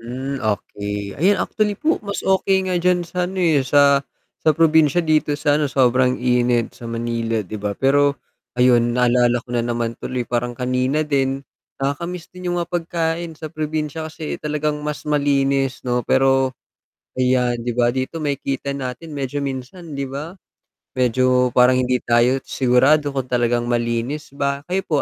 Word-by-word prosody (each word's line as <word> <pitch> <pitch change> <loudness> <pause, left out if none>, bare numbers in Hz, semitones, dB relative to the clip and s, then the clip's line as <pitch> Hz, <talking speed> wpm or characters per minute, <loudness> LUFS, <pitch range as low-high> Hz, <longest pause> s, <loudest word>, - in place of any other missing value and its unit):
Hmm, 130 +3 -5
okey. 105 -1 -3
Ayan, 195 +4 +4
actually 210 -1 -1
po 320 +2 0
mas 200 -1 -5
okey 190 0 +2
nga 185 - 0
diyan 180 0 +2
sa 180 +1 -2
ano, 190 - -8
eh, 160 -5 +3
sa 140 +1 +4 0.4
sa 155 - +3
probinsiya, 160 0 +4
dito 155 -2 +2
sa 145 0 +2
ano, 150 - +1
sobrang 125 -1 +3
init 125 -1 +1
sa 120 - -9
Manila, 115 -2 -2
'di 110 - -6
ba. 100 -1 -3
Pero 140 +1 +3 0.4
ayun, 120 -1 +3
naalala 120 0 +3
ko 125 - -9
na 120 - +1
naman 120 -1 -2
tuloy 125 -1 -3
parang 120 0 -2
kanina 130 +4 0
din, 135 -2 0 0.3
nakaka-miss 170 +6 -4
din 180 0 -6
'yung 175 - -1
mga 170 0 -3
pagkain 165 -1 -2
sa 155 0 -8
probinsiya 155 0 -3
kasi 155 -1 -6
talagang 150 0 -2
mas 150 -1 -5
malinis 140 -3 +1
'no. 125 -1 0
Pero 135 0 +3 0.6
ayan, 125 -1 +2
'di 120 +1 -2
ba, 120 0 +3
dito 130 +5 -3
makikita 140 -2 -2
natin 140 +3 -6
medyo 140 -1 -3
minsan 140 +5 -6
'di 140 -1 -4
ba, 145 +6 -6 0.6
medyo 125 0 +2
parang 125 +1 +4
hindi 125 0 +1
tayo 120 +2 +3
sigurado 135 +4 +3
kung 135 -2 -3
talagang 120 -1 +1
malinis 120 +4 -2
ba. 140 0 -1
Kayo 190 +2 +1
po, 150 -4 +1
135 Hz, 165 wpm, -21 LUFS, 125-155 Hz, 0.6 s, Ayan